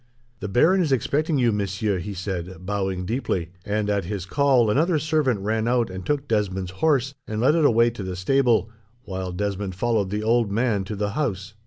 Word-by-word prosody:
"The 105 - -4
baron 165 - +4
is 160 -5 0
expecting 145 +5 +1
you, 120 -3 +3
monsieur," 100 -1 -1
he 100 +3 -6
said, 90 -1 -5
bowing 95 -2 -2
deeply; 95 -7 -2
and, 105 +1 -1
at 100 -3 0
his 95 -1 -4
call, 130 -2 +3
another 160 +7 +2
servant 150 -7 +1
ran 110 +2 -1
out 120 -4 +1
and 95 0 -6
took 145 +3 -1
Desmond's 95 -4 -1
horse, 140 -4 +2
and 110 0 -3
led 125 +6 +4
it 160 -2 +3
away 115 -2 +4
to 115 - -8
the 95 -1 -4
stable, 115 +3 +2 0.3
while 95 -3 -5
Desmond 100 0 -3
followed 110 -1 0
the 105 +2 -2
old 115 -1 +2
man 110 -2 +1
to 105 - -5
the 100 0 -2
house. 105 -7 -3
105 Hz, 195 wpm, -24 LUFS, 95-125 Hz, 0.3 s, baron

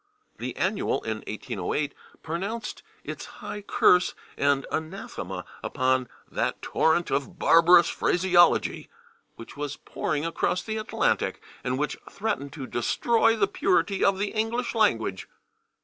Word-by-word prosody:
The - - -4
/Annual/, - - 0
in - - -2
1808, 145 -1 -3 0.3
pronounced 195 +8 -4 0.2
its - - -6
high 210 - -8
curse 180 -2 +3 0.2
and 140 -1 +2
anathema 155 - -5 0.2
upon 130 0 +1 0.2
"that - - -1
torrent 165 +2 +2
of 140 -1 -1
barbarous 170 +1 +6
phraseology" 175 -1 +3 0.5
which 115 - -11
was 145 -1 -4
pouring 150 +1 -3
across 165 +2 0
the 220 0 -3
Atlantic, 215 - 0 0.2
and 130 +1 -1
which 150 +2 -1
threatened 195 -10 -3
"to 140 -5 -6
destroy 225 - +2
the 415 - +3
purity 225 - +1
of 195 -1 +4
the 200 +1 -1
English 235 +2 -1
language." 115 - +1
175 Hz, 125 wpm, -26 LUFS, 140-210 Hz, 0.5 s, barbarous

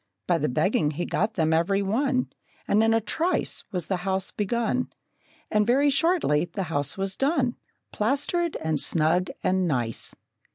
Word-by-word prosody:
By 170 -2 +2
the 150 - 0
begging 155 +2 +1
he 155 +4 -3
got 215 +3 -1
them 160 -2 +2
every 195 +5 +2
one, 255 +6 0 0.3
And 215 +2 +3
in 225 - +3
a 225 - +4
trice 320 - -1
Was 180 -5 -3
the 190 +3 -1
house 190 +1 -1
begun, 235 +4 -1 0.6
And 210 -1 +2
very 280 +4 +4
shortly 275 - +2
the 185 +3 -4
house 145 +3 -1
was 195 0 -2
done, 270 -3 +1 0.4
Plastered 290 +9 0
and 160 -1 0
snug 165 +3 +2
and 185 -1 +1
nice. 120 -7 -2
195 Hz, 160 wpm, -26 LUFS, 170-250 Hz, 0.6 s, a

